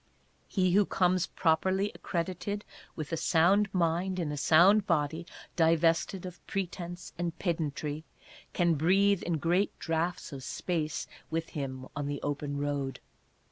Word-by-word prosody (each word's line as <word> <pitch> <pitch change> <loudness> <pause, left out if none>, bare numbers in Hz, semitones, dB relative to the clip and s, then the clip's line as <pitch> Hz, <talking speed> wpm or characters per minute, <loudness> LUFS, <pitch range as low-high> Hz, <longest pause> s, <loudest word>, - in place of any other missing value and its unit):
He 185 -3 +1
who 200 +2 +4
comes 185 -1 +2
properly 190 +5 +1
accredited 185 +4 -3 0.3
with 155 0 -5
a - - +1
sound 190 +5 +3
mind 180 +1 +1
in 165 -5 -1
a - - -3
sound 180 +8 +5
body, 160 0 0 0.3
divested 165 +2 +2
of 180 -1 -9
pretence 175 -2 -4
and 170 -1 -2
pedantry, 155 -3 -2 0.5
can 175 -2 +2
breathe 190 +5 +3
in 170 -2 -1
great 175 +6 +1
draughts 165 0 -2
of 135 - -6
space 155 +1 -2 0.2
with 165 0 -2
him 130 -3 -5
on 145 0 -2
the 145 -1 -3
Open 145 0 -2
Road. 140 -2 -2
170 Hz, 140 wpm, -30 LUFS, 155-185 Hz, 0.5 s, sound